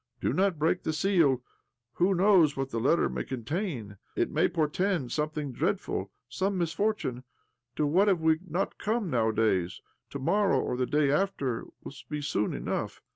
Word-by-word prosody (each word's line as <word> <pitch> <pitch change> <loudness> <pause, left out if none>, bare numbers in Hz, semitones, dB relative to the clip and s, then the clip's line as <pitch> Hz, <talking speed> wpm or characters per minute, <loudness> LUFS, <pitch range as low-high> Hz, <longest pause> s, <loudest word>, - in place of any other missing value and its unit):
" - - -48
Do - - 0
not 190 -3 +2
break 160 +4 +1
the 160 - -2
seal. 155 -8 +2 0.5
Who 185 +2 +2
knows 180 -6 +4
what 135 0 -2
the 115 - -1
letter 135 +8 +3
may - - -3
contain? 130 - -4 0.2
It - - 0
may - - +3
portend 165 - 0
something 150 -1 -2
dreadful, 150 - -2 0.2
some 190 +9 -1
misfortune. 170 - -1 0.5
To 150 - +1
what 180 +8 +3
have 190 -4 +3
we 160 0 +3
not 175 +4 -2
come 215 -4 -1
nowadays? 110 -6 +1 0.3
To - - -5
morrow, 195 +9 +2
or - - -1
the 125 0 -1
day 145 -2 +2
after, 145 -8 0 0.2
will - - -8 0.2
be 150 -1 -3
soon 120 -8 0
enough. - - -3
155 Hz, 170 wpm, -28 LUFS, 130-185 Hz, 0.5 s, knows